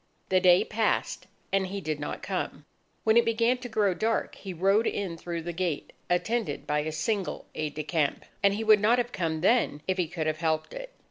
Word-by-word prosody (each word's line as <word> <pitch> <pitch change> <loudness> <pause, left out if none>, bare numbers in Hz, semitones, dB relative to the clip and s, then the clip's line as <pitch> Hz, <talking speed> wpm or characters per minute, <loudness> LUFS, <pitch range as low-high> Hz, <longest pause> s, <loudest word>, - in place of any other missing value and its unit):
The 185 - +4
day 180 0 +5
passed, 220 0 -1 0.3
and 195 -1 +2
he 200 +2 -4
did 155 -5 -3
not 145 - -5
come. - - -3 0.4
When 220 +1 +4
it 235 - +7
began 230 +2 +2
to 250 -1 -7
grow 210 -4 +2
dark, 225 +5 -1
he 195 - -8
rode 195 +6 +2
in 190 -4 -2
through 170 0 -5
the 175 +1 -4
gate 170 -3 -2 0.2
attended 180 -2 0
by 150 0 +1
a 155 +1 -2
single 190 +5 -2
aide 155 -1 -3
de 155 - -3
camp. 155 -2 -1 0.2
And 200 -1 +4
he 220 - -2
would 215 -1 +6
not 220 +4 +4
have 245 0 -1
come 160 -4 -2
then, 185 -7 +2
if 185 0 0
he 175 - +1
could 165 -1 -3
have 155 0 0
helped 160 -2 -1
it. - - -7
185 Hz, 215 wpm, -28 LUFS, 160-220 Hz, 0.4 s, it